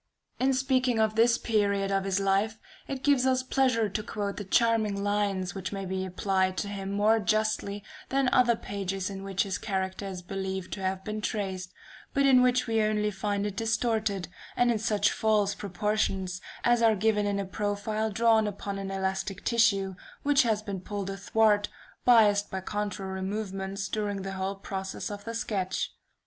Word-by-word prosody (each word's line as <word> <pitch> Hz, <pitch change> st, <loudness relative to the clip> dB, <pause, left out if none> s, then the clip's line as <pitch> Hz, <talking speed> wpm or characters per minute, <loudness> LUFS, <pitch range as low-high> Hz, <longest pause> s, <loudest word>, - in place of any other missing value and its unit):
In 265 Hz, +1 st, +3 dB
speaking 255 Hz, -2 st, +2 dB
of 220 Hz, -1 st, +3 dB
this 235 Hz, +2 st, +4 dB
period 200 Hz, -4 st, +1 dB
of 195 Hz, 0 st, +1 dB
his 195 Hz, 0 st, +1 dB
life, 195 Hz, +3 st, +1 dB, 0.3 s
it 270 Hz, -1 st, -5 dB
gives 275 Hz, -3 st, +4 dB
us 255 Hz, 0 st, +2 dB
pleasure 255 Hz, -4 st, +2 dB
to 205 Hz, +2 st, -3 dB
quote 205 Hz, -2 st, -4 dB
the 205 Hz, -, -4 dB
charming 215 Hz, -1 st, +2 dB
lines 200 Hz, -3 st, 0 dB
which 190 Hz, -1 st, -5 dB
may 195 Hz, -1 st, -4 dB
be 190 Hz, 0 st, -2 dB
applied 185 Hz, 0 st, 0 dB
to 205 Hz, -, -1 dB
him 195 Hz, -1 st, -5 dB
more 210 Hz, +3 st, +3 dB
justly, 215 Hz, -1 st, 0 dB, 0.3 s
than 270 Hz, 0 st, +2 dB
other 245 Hz, -2 st, +4 dB
pages 195 Hz, -2 st, -4 dB
in 195 Hz, 0 st, -6 dB
which 195 Hz, -1 st, 0 dB
his 195 Hz, -2 st, -3 dB
character 190 Hz, -1 st, -3 dB
is 185 Hz, -2 st, -6 dB
believed 190 Hz, 0 st, -4 dB
to 195 Hz, -, -5 dB
have 190 Hz, 0 st, -2 dB
been 215 Hz, +1 st, -4 dB
traced, 190 Hz, -4 st, -3 dB, 0.4 s
but 275 Hz, 0 st, +4 dB
in 260 Hz, -2 st, +6 dB
which 250 Hz, 0 st, +3 dB
we 225 Hz, -1 st, +1 dB
only 210 Hz, 0 st, +1 dB
find 200 Hz, +1 st, -2 dB
it 205 Hz, -2 st, -3 dB
distorted, 220 Hz, -4 st, 0 dB, 0.3 s
and 245 Hz, 0 st, +4 dB
in 225 Hz, -, 0 dB
such 210 Hz, -2 st, +2 dB
false 210 Hz, -2 st, +2 dB
proportions 195 Hz, -2 st, -1 dB, 0.2 s
as 240 Hz, -1 st, +3 dB
are 225 Hz, -1 st, +5 dB
given 210 Hz, 0 st, +2 dB
in 200 Hz, 0 st, 0 dB
a 200 Hz, -, -2 dB
profile 210 Hz, +2 st, -2 dB
drawn 220 Hz, +1 st, +3 dB
upon 200 Hz, 0 st, -4 dB
an 195 Hz, -1 st, -4 dB
elastic 190 Hz, 0 st, -3 dB
tissue, 200 Hz, -5 st, +3 dB, 0.3 s
which 285 Hz, -1 st, +5 dB
has 220 Hz, -3 st, +1 dB
been 200 Hz, -3 st, -5 dB
pulled 200 Hz, 0 st, -4 dB
athwart, 205 Hz, +1 st, +2 dB, 0.4 s
biased 210 Hz, -4 st, +5 dB
by 190 Hz, -, -3 dB
contrary 195 Hz, -1 st, -4 dB
movements 195 Hz, -1 st, -3 dB
during 205 Hz, -2 st, -2 dB
the 195 Hz, 0 st, -4 dB
whole 190 Hz, +1 st, -2 dB
progress 195 Hz, 0 st, -5 dB
of 205 Hz, 0 st, -7 dB
the 230 Hz, 0 st, -4 dB
sketch. 205 Hz, -6 st, -2 dB
205 Hz, 180 wpm, -28 LUFS, 195-220 Hz, 0.4 s, in